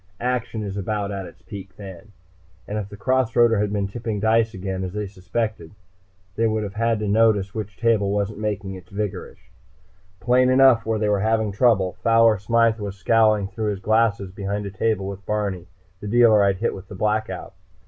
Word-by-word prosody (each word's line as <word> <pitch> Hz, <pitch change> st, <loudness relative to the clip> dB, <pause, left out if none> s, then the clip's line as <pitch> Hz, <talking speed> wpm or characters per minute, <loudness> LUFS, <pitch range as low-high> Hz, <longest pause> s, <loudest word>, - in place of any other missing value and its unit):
Action 120 Hz, -3 st, -2 dB
is 100 Hz, -1 st, -5 dB
about 100 Hz, +1 st, -2 dB
at 95 Hz, -2 st, -5 dB
its -, -, -16 dB
peak 95 Hz, -3 st, -10 dB
then, 100 Hz, +1 st, -11 dB, 0.6 s
and 105 Hz, +1 st, -3 dB
if 100 Hz, -1 st, -6 dB
the 105 Hz, -, -10 dB
cross 130 Hz, +2 st, +1 dB
roader 115 Hz, -3 st, +4 dB
had 105 Hz, -1 st, -1 dB
been 100 Hz, -1 st, -1 dB
tipping 110 Hz, +1 st, -4 dB
dice 110 Hz, +1 st, +2 dB
again, 95 Hz, -1 st, -4 dB
as 90 Hz, -1 st, -5 dB
they 105 Hz, 0 st, -3 dB
suspected, 100 Hz, -2 st, -4 dB, 0.6 s
they 115 Hz, 0 st, +2 dB
would 110 Hz, -1 st, -1 dB
have 100 Hz, -1 st, -5 dB
had 115 Hz, +1 st, +1 dB
time 105 Hz, -, -3 dB
to -, -, -2 dB
notice 105 Hz, -2 st, +2 dB
which 105 Hz, -2 st, -6 dB
table 115 Hz, -4 st, +2 dB
wasn't 100 Hz, +1 st, -2 dB
making 105 Hz, -2 st, -3 dB
its 90 Hz, -2 st, -11 dB
vigorish. 100 Hz, -1 st, -6 dB, 0.7 s
Plain 125 Hz, +6 st, +3 dB
enough 130 Hz, -3 st, +5 dB
where 110 Hz, -1 st, +1 dB
they 105 Hz, 0 st, 0 dB
were 105 Hz, -1 st, +2 dB
having 110 Hz, 0 st, +1 dB
trouble. 100 Hz, -4 st, +2 dB
Fowler 115 Hz, -1 st, +4 dB
Smythe 115 Hz, +2 st, +2 dB
was 100 Hz, -2 st, -5 dB
scowling 110 Hz, -1 st, +3 dB
through 110 Hz, -1 st, -3 dB
his 100 Hz, -2 st, -3 dB
glasses 105 Hz, -2 st, +1 dB
behind 100 Hz, +1 st, -4 dB
a 100 Hz, -, -5 dB
table 100 Hz, 0 st, -1 dB
with 100 Hz, 0 st, -7 dB
Barney, 100 Hz, -5 st, -2 dB, 0.3 s
the 105 Hz, -, -7 dB
dealer 110 Hz, -2 st, +5 dB
I'd 100 Hz, -1 st, +2 dB
hit 115 Hz, +5 st, -1 dB
with 95 Hz, 0 st, -10 dB
the 100 Hz, -, -9 dB
Blackout. 110 Hz, +3 st, -2 dB
105 Hz, 200 wpm, -23 LUFS, 100-115 Hz, 0.7 s, enough